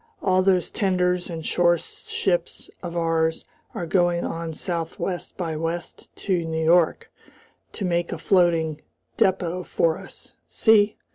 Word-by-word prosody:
All 185 -1 +3
those 185 -2 +2
tenders 180 -2 +1
and 165 -2 -6
store 175 -1 +3
ships 175 +1 -2
of 175 -1 -5
ours 165 -1 0 0.3
are 175 - -3
going 175 0 +1
on 165 0 -4
southwest 170 +2 -4
by 165 -4 -3
west 165 +2 -4
to 185 -4 -1
New 160 0 -2
York 170 0 +3 0.6
to 200 - -3
make 175 -1 0
a 175 - -3
floating 165 -3 +2 0.4
depot 180 -2 +1
for 165 -2 0
us. - - -11 0.2
See?" 215 -2 +4
175 Hz, 135 wpm, -24 LUFS, 165-180 Hz, 0.6 s, See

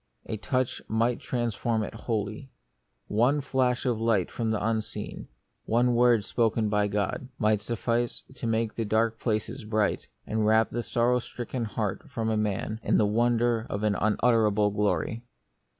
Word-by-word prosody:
A - - -3
touch 130 +4 -1
might 115 +2 +1
transform 115 -2 -1
it - - -6
wholly. 110 +2 -3 0.6
One 125 +7 +2
flash 130 -3 0
of 120 -3 +1
light 110 -6 +2
from 115 -2 -2
the 110 -1 0
Unseen, 110 -1 -3 0.4
one 120 +2 +3
word 120 -3 +4
spoken 115 -2 +1
by 105 0 +2
God, 105 +5 -2
might 105 -2 +2
suffice 115 +2 -1
to 125 -3 -5
make 115 0 0
the 115 - -2
dark 110 +1 +1
places 115 +2 -2
bright, 105 -1 0 0.2
and 110 0 -1
wrap 110 +1 +3
the 120 - -2
sorrow 120 +1 +1
stricken 120 0 -5
heart 105 -2 -2 0.2
of 110 -1 +1
man 105 +1 -2
in - - +2
the 110 - +4
wonder 115 +1 +2
of 100 +1 -3
an 105 -1 +2
unutterable 105 -1 +2
glory. 105 +2 0
115 Hz, 155 wpm, -27 LUFS, 105-120 Hz, 0.6 s, word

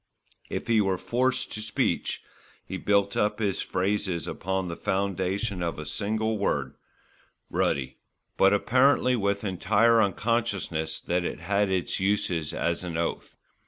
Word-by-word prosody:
If - - -3
he 115 -2 +3
were 95 -2 +1
forced 130 +5 0
to 105 - -5
speech, 110 - -1 0.4
he 95 - -5
built 100 0 +2
up 105 0 +1
his 100 -4 -1
phrases 95 -3 -1
upon 95 0 -2
the 85 - -4
foundation 95 +1 -1
of 85 -1 -2
a 75 - -6
single 110 +3 -1
word, 100 - 0 0.8
"ruddy"; 65 -2 0 0.4
but 95 - +5
apparently 125 +4 +3
with 100 -2 0
entire 110 +4 +3
unconsciousness 100 -6 -1
that 90 0 0
it 85 - -4
had 100 +3 +1
its 95 -2 -1
uses 95 -5 0
as 85 +1 -1
an 85 -2 -4
oath. 85 0 -3
100 Hz, 140 wpm, -27 LUFS, 90-110 Hz, 0.8 s, but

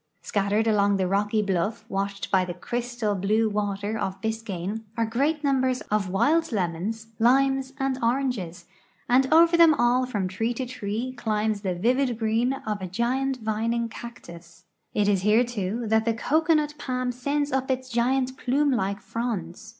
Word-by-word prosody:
Scat 200 -1 -1
tered 215 +2 +2
along 200 -2 +3
the 190 -1 0
rock}'' 205 +2 +1
bluff, 200 +4 -1
washed 200 -1 -3
by 190 -1 +4
the 175 -1 -5
crystal 240 +2 -2
blue 210 +4 +1
water 205 +1 -2
of 190 0 -3
Biscayne, 220 -2 -3 0.2
are 230 - +2
great 285 +7 0
numbers 260 -2 +1
of 210 -3 +1
wild 290 - +2
lemons, 205 +3 -2
limes, 270 +3 +3
and 270 -2 -1
oranges, 235 -8 -1 0.4
and 260 +3 +3
over 335 +2 +6
them 335 -2 +7
all 250 +1 +2
from 205 -7 -2
tree 225 +6 -2
to 260 - -3
tree 245 0 -4
climbs 215 -3 -1
the 185 -3 -2
vivid 245 +5 +1
green 225 +3 +1
of 215 -7 -4
a 185 - -3
giant 255 +7 -1
vining 225 +2 -1
cactus. 170 -8 -11 0.3
It 205 -1 +2
is 200 -3 +2
here, 210 +4 +4
too, 230 -1 -3
that 220 0 +3
the 230 -1 +1
cocoanut 305 +3 +1
palm 255 -1 -2
sends 285 +4 -1
up 265 0 -1
its 260 0 -1
giant 255 +2 0
plume 280 +3 +1
like 200 -4 -1
fronds. 220 -4 -4
225 Hz, 165 wpm, -25 LUFS, 200-255 Hz, 0.4 s, them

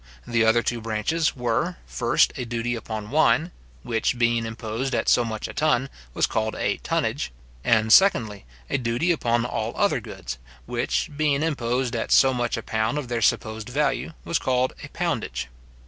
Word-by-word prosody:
The 115 -1 +2
other 115 +1 +4
two 120 -1 -2
branches 115 +9 0
were, 125 +8 -1
first, 120 -1 +2
a 130 - -3
duty 120 0 -2
upon 110 -2 -5
wine, 155 +3 +3 0.3
which 115 +1 0
being 115 -1 +2
imposed 115 +3 -3
at - - -1
so 120 - +5
much 110 -2 -4
a - - -8
ton, 140 -3 +1 0.2
was - - +3
called 110 0 -1
a - - 0
tonnage; - - -1 0.3
and, 110 -1 +4
secondly, 110 - +4 0.2
a 140 - 0
duty 120 +8 +1
upon 120 -7 +1
all 125 - -3
other - - +2
goods, - - -7 0.3
which - - -1
being 145 -1 +1
imposed 125 -5 -1
at 115 - -2
so 135 -1 +6
much 120 -2 -1
a 115 - -5
pound 110 +6 -1
of 140 -5 -4
their 120 -1 -1
supposed 110 0 0
value, 150 +4 0
was 170 - 0
called 130 0 +1
a - - -6
poundage. - - -2
120 Hz, 175 wpm, -24 LUFS, 115-135 Hz, 0.3 s, so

